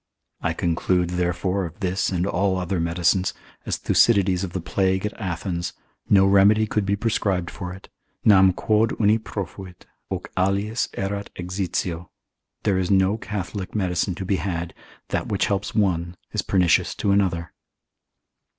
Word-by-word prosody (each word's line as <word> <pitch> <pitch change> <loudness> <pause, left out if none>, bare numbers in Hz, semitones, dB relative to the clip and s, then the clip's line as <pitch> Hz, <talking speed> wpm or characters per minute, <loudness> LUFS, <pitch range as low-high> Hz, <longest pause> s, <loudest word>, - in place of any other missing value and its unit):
I - - 0
conclude, 90 +1 0
therefore, 90 +2 0
of 85 +2 -7
this 95 -2 0
and 90 -2 0
all 95 -1 +1
other 90 0 -1
medicines, 85 +2 +1 0.3
as - - 0
Thucydides 100 -5 +3
of 95 - -4
the 95 - -2
plague 95 +2 0
at 105 - -2
Athens, 85 -2 -3 0.4
no 95 -1 +6
remedy 100 +2 +5
could 105 -2 -1
be 100 - +2
prescribed 100 -5 -1
for 90 0 -6
it, 95 +1 -11 0.4
Nam 95 -3 +7
quod 110 +4 +1
uni 110 +1 +4
profuit, 95 -3 -7 0.2
hoc - - -5
aliis 100 +5 0
erat 100 +1 -3
exitio: 90 -2 -3 0.5
there 95 -2 +2
is 90 - -1
no 95 +1 +3
Catholic 100 -2 -5
medicine 90 -2 0
to 95 - -5
be 95 +1 +1
had: 85 -1 -3 0.4
that - - -1
which 100 - +1
helps 100 -2 -2
one, 90 -4 0
is - - 0
pernicious 90 -3 +2
to 100 - 0
another. 90 -4 +1
95 Hz, 150 wpm, -23 LUFS, 90-100 Hz, 0.5 s, Nam